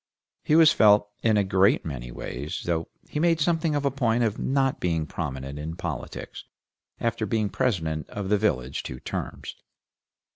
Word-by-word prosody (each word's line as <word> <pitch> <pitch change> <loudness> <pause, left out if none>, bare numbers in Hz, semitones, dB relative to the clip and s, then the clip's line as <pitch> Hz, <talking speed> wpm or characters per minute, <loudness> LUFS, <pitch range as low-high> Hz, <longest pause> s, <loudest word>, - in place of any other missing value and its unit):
He 150 - +3
was 160 -1 +7
felt 105 -1 +5
in 110 -2 +3
a 100 - +3
great 95 +1 +3
many - - -5
ways, 65 +4 -5
though 85 -2 -1 0.2
he 150 - -3
made 165 0 +3
something 160 -1 +1
of 145 -1 -1
a 140 - +2
point 120 -3 +1
of 110 -2 -1
not 135 0 +1
being 80 -3 0
prominent 70 0 -5
in 80 +2 -5
politics, - - -6 0.6
after 115 -2 -1
being 105 0 0
president 80 - -1
of 100 -2 -5
the 105 - +4
village 65 -12 0
two 65 - -7
terms. - - -5
105 Hz, 170 wpm, -26 LUFS, 80-130 Hz, 0.6 s, was